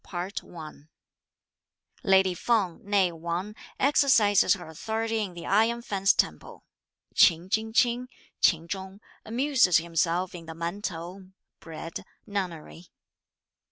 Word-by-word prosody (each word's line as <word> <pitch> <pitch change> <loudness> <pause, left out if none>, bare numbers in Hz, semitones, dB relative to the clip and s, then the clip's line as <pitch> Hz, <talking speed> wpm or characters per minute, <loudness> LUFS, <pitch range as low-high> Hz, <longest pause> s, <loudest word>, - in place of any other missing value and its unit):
CHAPTER 180 +2 -5
XV. 155 -3 -11 1.1
Lady 190 -1 +4
Peng, 195 -3 0
née 195 -3 +1
Wang, 170 +5 -4 0.3
exercises 255 -9 +4
her 180 -4 -10
authority 220 +7 -3
in 190 -4 -5
the 170 - -8
Iron 225 +4 +2
Fence 195 -3 +2
Temple. - - -2 0.5
Ch'in 175 +1 +4
Ching 220 +1 0
ch'ing 245 +2 +2 0.3
(Ch'ing 165 -2 +3
Chung) 190 +1 -6 0.3
amuses 245 - +3
himself 170 +2 -1
in 170 -2 -10
the 160 - -8
Man 170 +5 -4
t'ou 185 +1 -7 0.3
(Bread) 165 0 -8 0.2
nunnery. 180 -4 -5
190 Hz, 120 wpm, -27 LUFS, 170-215 Hz, 1.1 s, Lady